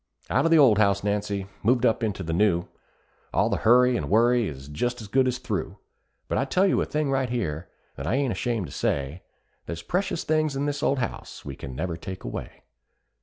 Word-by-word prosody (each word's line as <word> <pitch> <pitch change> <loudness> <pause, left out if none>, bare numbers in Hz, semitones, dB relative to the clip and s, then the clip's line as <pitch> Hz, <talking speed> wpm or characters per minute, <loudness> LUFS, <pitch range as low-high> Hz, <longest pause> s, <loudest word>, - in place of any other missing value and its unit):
Out - - +3
of - - +4
the 165 - +6
old 125 -8 +6
house, 100 -2 +3
Nancy 100 -1 -1 0.2
moved 120 +3 +3
up 115 - +2
into 105 -4 -2
the 80 -1 -3
new; 85 -2 +2 0.7
All - - +2
the - - +1
hurry 125 +2 +5
and - - -2
worry 120 +1 +4
is 70 -2 -8
just 120 +12 -2
as 110 - -8
good 130 +5 +3
as 125 -1 0
through; - - -4 0.5
But - - 0
I 135 - +1
tell 185 +8 +2
you 195 - +2
a - - 0
thing 150 -2 -1
right 135 -2 0
here, 85 -9 -3 0.3
that 70 - -5
I 115 - +1
ain't 135 -2 +1
ashamed 115 -6 -1
to 70 - -10
say, 70 +7 -2 0.5
There's 85 0 -5
precious 180 -2 -1
things 155 -2 +1
in 140 +1 -1
this 145 0 -2
old 140 - +2
house 120 -3 -5
we 70 -2 -6
never 75 +6 -4
can - - -23
take 95 -1 -7
away. - - -7
115 Hz, 220 wpm, -26 LUFS, 90-130 Hz, 0.7 s, the